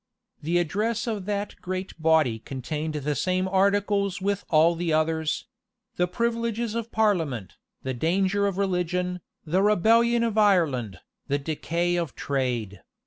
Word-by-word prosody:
[] - - -46
The 170 +4 0
address 210 +7 0
of 215 -5 -3
that 205 0 -3
great 185 -2 -5
body 155 -8 +3
contained 150 +6 -4
the 150 0 -1
same 185 +4 0
articles 200 0 +1
with 200 +1 -1
all 165 +1 +5
the 170 0 -2
others; 155 0 0 0.5
the 180 - +1
privileges 230 +2 -1
of 230 0 -4
parliament, 165 - 0 0.3
the 130 - -2
danger 190 +8 +1
of 195 -2 -3
religion, 180 -1 -1 0.2
the 175 +5 +1
rebellion 230 +4 +4
of 220 -2 +1
Ireland, 145 - +2 0.3
the 140 0 +1
decay 170 +4 -1
of 170 -6 -3
trade. 120 -8 -2
180 Hz, 140 wpm, -26 LUFS, 155-205 Hz, 0.5 s, all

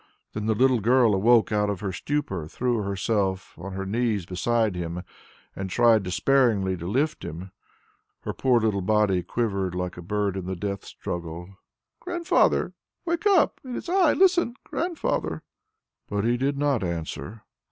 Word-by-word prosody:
Then 105 0 -3
the 110 - +2
little 130 +1 +4
girl 120 0 +4
awoke 110 +4 +4
out 105 -1 +1
of 100 -3 -3
her 100 -2 -2
stupor, 95 - -3
threw 120 +6 -1
herself 100 -1 -1
on 95 +3 -7
her 95 0 -4
knees 110 -2 0
beside 110 +3 0
him, 85 0 -4 0.5
and 95 0 -4
tried 115 +1 +4
despairingly 100 -1 +2
to 85 0 -6
lift 140 - 0
him; 90 +4 -7 0.7
her - - -4
poor 125 -2 +3
little 110 -3 0
body 100 -1 +2
quivered 100 -3 -2
like 90 -1 -3
a - - -6
bird 100 +2 -1
in 95 -2 -5
the 95 - -2
death 100 +2 -4
struggle. 85 +2 -6 0.4
"Grandfather! 345 -1 +1 0.3
Wake 340 +4 0
up! 385 -5 +3
It 255 -2 -6
is - - -6
I! 360 -3 +4
Listen, 350 -9 +3
Grandfather!" 345 -1 -2 0.7
But 100 -1 -1
he 120 +2 +2
did 135 +3 -1
not 140 -6 +1
answer. 85 +5 -5
105 Hz, 160 wpm, -25 LUFS, 95-125 Hz, 0.7 s, little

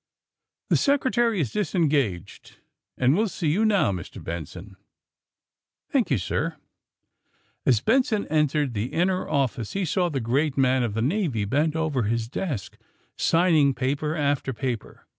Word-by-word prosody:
"The - - +5
Secretary 250 -6 +2
is 135 -9 -1
disengaged, 140 - -1 0.4
and 130 +3 +3
will 220 +4 +2
see 175 -5 -2
you 200 +8 +1
now, 200 - +3
Mr. 90 -3 -7
Benson." 85 +4 -7 0.4
' - - -66
' - - -66
Thank - - +2
you, - - +2
sir. - - -2 0.5
* - - -50
' - - -41
As 120 -5 +4
Benson 225 - +2
entered 150 -3 +1
the 110 +3 -3
inner 185 +2 0
office 135 -6 -1
he 195 -1 -1
saw 175 +2 +1
the 140 -4 -2
great 135 +5 0
man 130 -1 +3
of 115 -4 -2
the 115 - 0
Navy 145 - 0
bent 150 +8 +1
over 155 -5 0
his 115 +1 -1
desk, 125 - -4 0.4
sign 170 +1 +2
ing 140 -3 +4
paper 140 +4 -1
after 145 -3 0
paper. 120 -2 -5
145 Hz, 160 wpm, -25 LUFS, 120-175 Hz, 0.5 s, The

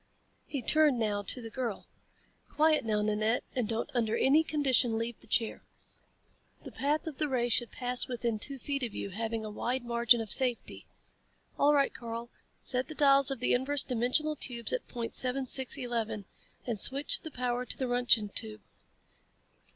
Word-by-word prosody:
He 275 -4 -4
turned 305 0 +4
now 210 -3 0
to 240 +4 -3
the 225 - -8
girl. 240 -5 -4 0.6
"Quiet, 310 0 +3
now, 210 -2 0
Nanette, 215 +2 +1
and 245 -4 0
don't 225 0 -2
under 230 -3 0
any 295 +4 +4
condition 265 -7 +2
leave 230 0 -3
the - - -13
chair. 225 -2 +1 1.0
The - - -9
path 295 +3 -1
of 310 -4 -6
the 305 - +1
ray 245 -2 0
should 235 0 +3
pass 250 0 -3
within 235 -3 -2
two 275 +5 -2
feet 275 +1 -3
of 235 -4 -3
you, 200 - -5
having 225 +2 -3
a 215 - -6
wide 245 +4 -2
margin 235 0 +4
of 220 -3 -5
safety. 250 -3 -1 0.7
All 295 +1 +5
right, 280 -1 +2
Karl. 235 0 -7 0.3
Set 255 +1 0
the 310 - -8
dials 275 -2 +5
of 270 -3 -3
the - - +2
inverse 270 +3 +2
dimensional 255 +5 0
tubes 240 - -3
at - - -3
point 235 -2 -5
seven 260 +1 +2
six 260 0 +3
eleven, 225 -4 -3 0.4
and 230 -4 -3
switch 275 +6 +1
the 315 - -7
power 250 -2 -2
to - - -5
the 260 - -2
Roentgen 245 -4 +3
tube." 105 - -6
245 Hz, 180 wpm, -30 LUFS, 225-275 Hz, 1.0 s, All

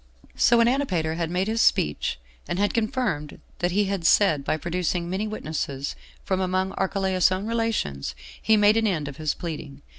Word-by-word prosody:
6. - - -1
So 235 - +6
when 230 0 +5
Antipater 190 - 0
had 165 0 -2
made 180 +3 0
this 225 +1 +1
speech, 75 -4 +1 0.3
and - - -2
had 205 +1 +1
confirmed 215 - -1 0.2
what 175 - +1
he 205 +3 +2
had 195 -3 -2
said 165 -5 +4
by 155 - 0
producing 175 +1 -2
many 190 +4 -2
witnesses 150 -8 -4 0.3
from 190 -1 -1
among 185 +1 0
Archelaus's 190 -1 +1
own 185 +2 -2
relations, 225 - -2 0.3
he 220 -1 +4
made 210 +1 +5
an 225 -1 +2
end 160 -7 -1
of 140 - -7
his 155 -2 -1
pleading. 150 -5 -7
185 Hz, 185 wpm, -25 LUFS, 160-210 Hz, 0.3 s, So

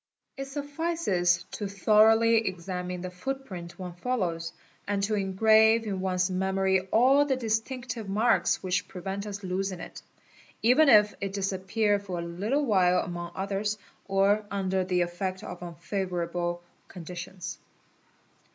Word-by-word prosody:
It 275 - -5
suffices 280 - 0
to 205 - -4
horoughly 220 +3 +5
examine 180 0 -4
the 185 0 -5
footprint 185 -4 -6
one 180 -2 -6
follows, 175 -6 -2 0.4
and 200 -1 0
to 215 +2 0
engrave 220 +3 +4
in 195 -3 -3
one's 185 -1 +1
nemory 190 0 0
all 265 +5 +5
the 280 -2 0
distinctive 230 -1 -3
marks 220 +4 +2
which 185 0 -1
prevent 195 +2 -5
us 205 0 -6
losing 185 0 -2
it, - - -9 0.6
even 265 +6 +6
if 210 -3 +6
it 200 0 -3
ise 195 0 0
ppear 205 +2 0
for 190 -3 -5
a 170 - -3
little 210 +13 -1
while 180 -6 +3
among 175 0 -5
others, 200 +2 -2 0.3
or 200 +2 +3
under 190 -1 0
the 180 -1 0
effect 185 +2 -3
of 180 - -7
unfavour 175 +1 -3
ble 175 0 -2 0.2
conditions. 180 +1 -7
195 Hz, 140 wpm, -28 LUFS, 180-220 Hz, 0.6 s, even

